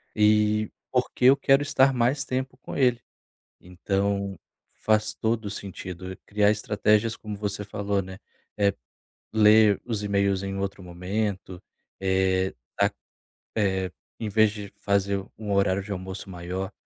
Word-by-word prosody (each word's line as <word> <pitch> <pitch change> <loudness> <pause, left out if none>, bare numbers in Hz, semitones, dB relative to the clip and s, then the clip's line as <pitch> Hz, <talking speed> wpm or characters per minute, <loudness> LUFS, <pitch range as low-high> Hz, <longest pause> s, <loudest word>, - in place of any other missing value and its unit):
e 105 0 +3 0.2
porque 125 0 0
eu 135 +2 +8
quero 135 +1 +4
estar 135 -2 +3
mais 130 +3 +1
tempo 130 0 -3
com - - -8
ele. 125 -3 +3 0.6
Então, 100 +1 -2 0.4
faz 110 0 +2
todo 110 -1 -1
o - - -3
sentido 95 -2 -7
eu - - -9
criar 105 0 +3
estratégias 105 +1 +1
como 105 -2 -7
você 105 0 -3
falou, 100 -1 -1
né. 95 +1 -9 0.4
Eh, 100 -1 +3 0.6
ler 105 -1 +6
os 115 -4 -2
e-mails 100 -1 +1
em 95 0 -4
outro 95 0 -3
momento, 95 +1 -3 0.4
eh, 95 0 +1 0.3
a, - - +4 0.7
eh, 95 -3 +1 0.3
em 110 - -3
vez 110 +1 +4
de 105 -1 -7
fazer 100 -1 +1
um 105 -2 -5
horário 100 0 +2
de 105 - -8
almoço 95 +1 -6
maior, 90 +2 -5
100 Hz, 140 wpm, -26 LUFS, 95-110 Hz, 0.7 s, eu